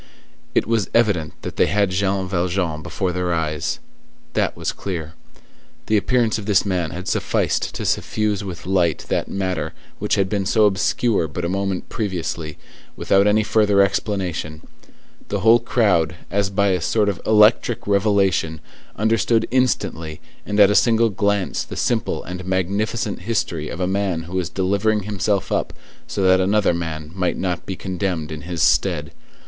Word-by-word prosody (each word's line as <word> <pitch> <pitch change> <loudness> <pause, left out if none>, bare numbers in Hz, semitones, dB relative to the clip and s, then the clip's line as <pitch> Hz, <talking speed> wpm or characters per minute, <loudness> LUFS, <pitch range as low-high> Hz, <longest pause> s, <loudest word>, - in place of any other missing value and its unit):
It - - +3
was 115 -2 0
evident 100 -10 +1
that - - -6
they - - +4
had 100 -2 +1
Jean 95 0 0
Valjean 85 -3 -1
before 95 +3 -2
their 90 0 -1
eyes. 80 -2 -1 0.6
That - - 0
was - - -2
clear. 80 -5 -5 0.7
The 110 - +1
appearance 115 +1 +2
of 105 - -8
this 105 -1 +3
man 90 -4 -1
had 95 +4 -7
sufficed - - 0
to - - -4
suffuse 105 -2 0
with 90 -4 -7
light 90 -4 +1
that - - 0
matter 95 -5 -2 0.3
which - - +1
had 100 -1 +1
been 95 -1 -1
so 110 +1 +4
obscure 100 -1 +1
but 85 +4 -4
a - - -1
moment 95 -1 -2
previously, 85 -6 -4 0.4
without 100 +1 +3
any 110 +1 +3
further 105 -2 +3
explanation: 95 -6 -1 0.6
the 100 -1 -2
whole 115 +3 +6
crowd, 100 -9 +2 0.2
as 100 0 +1
by 100 0 +2
a 90 -2 +1
sort 105 +4 +1
of 100 -3 -2
electric 110 +2 +4
revelation, 100 -5 +2 0.4
understood 115 +1 +2
instantly 85 -11 0 0.3
and 105 0 -1
at 100 -1 +7
a - - +1
single 115 0 +4
glance 100 -1 0
the - - -8
simple - - 0
and 90 +1 -6
magnificent 100 +4 -1
history 85 -6 -2
of 85 - -6
a 90 - +1
man 95 -3 -1
who 85 +2 -10
was 90 -3 -1
delivering 100 +3 0
himself 100 -1 -1
up - - -1 0.3
so 100 - -2
that 95 0 +5
another 100 0 +2
man 80 -2 -4
might 90 -1 -1
not 90 -2 -3
be 95 - -3
condemned 90 -4 -3
in 75 -1 -6
his 85 -1 -2
stead. - - +2
95 Hz, 165 wpm, -21 LUFS, 90-105 Hz, 0.7 s, at